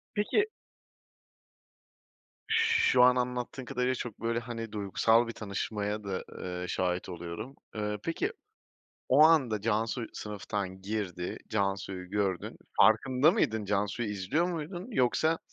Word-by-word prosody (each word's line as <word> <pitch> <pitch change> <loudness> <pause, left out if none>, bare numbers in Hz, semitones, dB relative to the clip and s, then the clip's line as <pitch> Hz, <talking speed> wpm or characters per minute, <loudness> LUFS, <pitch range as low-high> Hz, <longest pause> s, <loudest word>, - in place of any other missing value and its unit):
Peki 210 - +2 2.3
Şu 130 - +5
an 125 0 +7
anlattığın 125 +1 -2
kadarıyla 125 +1 0
çok, 120 -3 -6
böyle, 115 +1 0
hani, 115 -2 -6
duygusal 110 +3 +3
bir - - -3
tanışmaya 105 0 -3
da, 95 -2 -3
ııı, 90 0 -5
şahit 90 0 -1
oluyorum. 90 +9 -6 0.2
Eee, 105 -1 -2
peki, 360 - -1 0.8
o 140 +4 +7
anda 135 -10 +4
Cansu 115 +2 0
sınıftan 100 -2 -4
girdi, 95 -4 -3
Cansu'yu 95 -3 -2
gördün. 100 -4 -1 0.2
Farkında 125 +8 +5
mıydın? 110 - +1
Cansu'yu 105 +3 -1
izliyor 105 - 0
muydun? 175 +2 -4
Yoksa, 160 - +2
110 Hz, 115 wpm, -30 LUFS, 100-125 Hz, 2.3 s, an